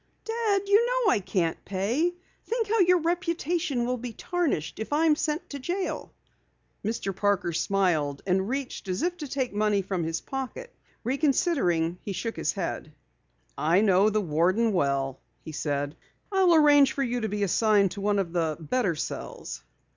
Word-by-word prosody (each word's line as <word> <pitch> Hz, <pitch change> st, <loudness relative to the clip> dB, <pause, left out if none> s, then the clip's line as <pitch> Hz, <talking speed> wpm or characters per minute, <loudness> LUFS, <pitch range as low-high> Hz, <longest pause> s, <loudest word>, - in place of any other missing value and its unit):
"Dad, 445 Hz, -3 st, 0 dB
you 410 Hz, +3 st, +5 dB
know -, -, +2 dB
I -, -, +3 dB
can't 180 Hz, -4 st, -1 dB
pay. 235 Hz, -, 0 dB, 0.3 s
Think 460 Hz, -2 st, -1 dB
how 450 Hz, +2 st, +1 dB
your 360 Hz, -1 st, +5 dB
reputation 335 Hz, -5 st, -1 dB
will 250 Hz, +1 st, -1 dB
be 240 Hz, -1 st, -6 dB
tarnished 325 Hz, -, -2 dB
if 220 Hz, -, -5 dB
I 305 Hz, +3 st, +3 dB
am 310 Hz, -2 st, +5 dB
sent 305 Hz, +2 st, -2 dB
to 285 Hz, -, -5 dB
jail." 355 Hz, +8 st, -3 dB, 0.7 s
Mr. 205 Hz, -3 st, -2 dB
Parker 200 Hz, -3 st, +1 dB
smiled 165 Hz, -5 st, 0 dB
and 190 Hz, +2 st, +1 dB
reached 265 Hz, -5 st, -4 dB
as 185 Hz, 0 st, -2 dB
if 350 Hz, +1 st, 0 dB
to 300 Hz, -4 st, -6 dB
take 260 Hz, -3 st, -2 dB
money 205 Hz, -1 st, +1 dB
from 185 Hz, -2 st, -2 dB
his 165 Hz, 0 st, -2 dB
pocket. 270 Hz, -, -6 dB, 0.3 s
Reconsidering, 250 Hz, -, +1 dB
he 200 Hz, -, -5 dB
shook 210 Hz, +5 st, -3 dB
his -, -, -1 dB
head. 170 Hz, -5 st, -4 dB, 0.6 s
"I 165 Hz, +6 st, +3 dB
know 200 Hz, 0 st, +4 dB
the 215 Hz, 0 st, +1 dB
warden 185 Hz, +7 st, +2 dB
well," 140 Hz, -5 st, 0 dB, 0.3 s
he 160 Hz, -, -6 dB
said. 145 Hz, -1 st, -2 dB, 0.4 s
"I'll 375 Hz, -3 st, +4 dB
arrange 290 Hz, -3 st, +6 dB
for 275 Hz, -, -1 dB
you 245 Hz, -1 st, -1 dB
to 220 Hz, -, -1 dB
be 205 Hz, 0 st, -1 dB
assigned 200 Hz, 0 st, +3 dB
to 200 Hz, -, -6 dB
one 205 Hz, 0 st, +1 dB
of 180 Hz, -4 st, -1 dB
the 160 Hz, -3 st, 0 dB
better 175 Hz, -, 0 dB
cells." -, -, -6 dB
220 Hz, 170 wpm, -27 LUFS, -, 0.7 s, arrange